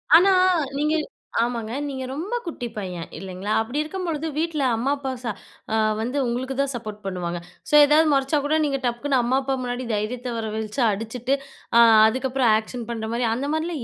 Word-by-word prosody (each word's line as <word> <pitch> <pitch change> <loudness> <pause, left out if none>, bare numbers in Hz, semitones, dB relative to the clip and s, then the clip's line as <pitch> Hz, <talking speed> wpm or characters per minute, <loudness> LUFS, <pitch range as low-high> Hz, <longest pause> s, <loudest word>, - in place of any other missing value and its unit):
ஆனா 360 +4 +7 0.5
நீங்க 300 +2 +1 0.5
ஆமாங்க. 230 -1 -2 0.2
நீங்க 265 -2 -4
ரொம்ப 360 - -3
குட்டி 290 -8 -4
பையன் 180 -4 -4
இல்லைங்களா. 190 +3 -5
அப்டி 235 +5 -4
இருக்கும்பொழுது 325 -1 -3
வீட்ல 315 -2 0
அம்மா, 245 +5 0
அப்பா 270 -1 -4
ச - - -8 0.8
வந்து 250 +5 -2
உங்களுக்கு 255 +3 -2
தான் 275 -1 -1
சப்போர்ட் 215 -3 -6
பண்ணுவாங்க. 175 -2 -3 0.3
ஸோ - - -6
எதாவது 305 +2 +5
மொறச்சா 275 +2 +2
கூட 310 +2 +2
நீங்க 275 -2 -1
டக்குன்னு 255 +3 0
அம்மா 245 +2 +1
அப்பா 270 0 -1
முன்னாடி 245 +1 -3
தைரியத்த 240 +4 -2
வர 225 -1 -3
வழைச்சு 220 +4 -3
அடிச்சுட்டு 225 +5 -1 0.4
அ - - +9 0.3
அதுக்கப்புறம் 260 0 +1
ஆக்ஷன் 225 +2 -5
பண்ற 220 -1 -4
மாரி 240 +1 0
அந்த 260 +5 -2
மாரிலாம் 315 -3 -2
250 Hz, 170 wpm, -24 LUFS, 225-285 Hz, 0.8 s, அ